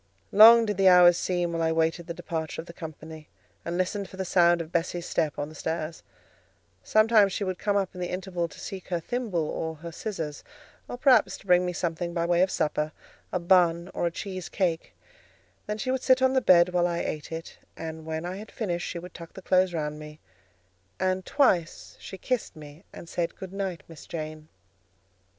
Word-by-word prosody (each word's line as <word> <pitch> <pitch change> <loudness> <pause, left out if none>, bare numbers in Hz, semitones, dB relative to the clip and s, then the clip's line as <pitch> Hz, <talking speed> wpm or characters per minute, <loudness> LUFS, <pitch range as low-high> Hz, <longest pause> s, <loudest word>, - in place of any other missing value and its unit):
Long 225 +3 +9
did 210 -3 -2
the 195 -1 +4
hours 180 -1 +8
seem 175 -1 -1
while 165 - -1
I 160 0 +2
waited 165 +1 0
the 170 - -4
departure 165 -2 -4
of 165 - -5
the 170 - -11
company, 160 -1 -9 0.4
and 170 +1 -3
listened 185 +1 -2
for 190 - -12
the 190 - -3
sound 175 -1 +4
of 165 -1 -6
Bessie's 175 0 -1
step 160 -4 -1
on 145 - -3
the 155 - -12
stairs: 160 +1 -4 0.8
sometimes 215 -2 +4
she 205 - -2
would 185 -2 -3
come 205 -1 +1
up 195 -2 -1
in 180 - -8
the 180 - -2
interval 180 -2 -3
to - - -14
seek 190 -2 -7
her 175 -2 -1
thimble 195 -5 -2
or 160 +1 -4
her 165 +2 -9
scissors, 160 -6 -5 0.4
or 245 - -6
perhaps 255 0 +4
to - - -19
bring 180 -1 +4
me - - -1
something 170 0 -3
by 170 -1 0
way 175 0 +2
of 190 - +3
supper—a 155 +3 -3
bun 175 -1 +3
or 175 - 0
a - - -2
cheese 185 0 -6
cake—then 210 - -5
she 255 +4 -2
would 260 0 -1
sit 260 -1 +4
on 260 0 +4
the 260 - +3
bed 180 -5 +6
while 175 -1 +2
I 170 -1 -2
ate 155 +1 -5
it, 165 +1 -7 0.2
and 160 0 -6
when 160 +1 -4
I 180 +2 -4
had 215 +2 -9
finished, 175 -6 -3
she - - -5
would 175 +1 -9
tuck 170 -1 -11
the 190 - -11
clothes 185 0 +3
round 150 -2 -3
me, 150 0 -11 0.8
and 185 0 0
twice 180 - +1
she 190 - -9
kissed 250 -3 -2
me, 150 +2 -12
and - - -11
said, 170 0 -3
"Good 190 0 -9
night, 190 -4 -4
Miss 165 -2 -13
Jane." 155 -1 -6
175 Hz, 205 wpm, -27 LUFS, 165-190 Hz, 0.8 s, Long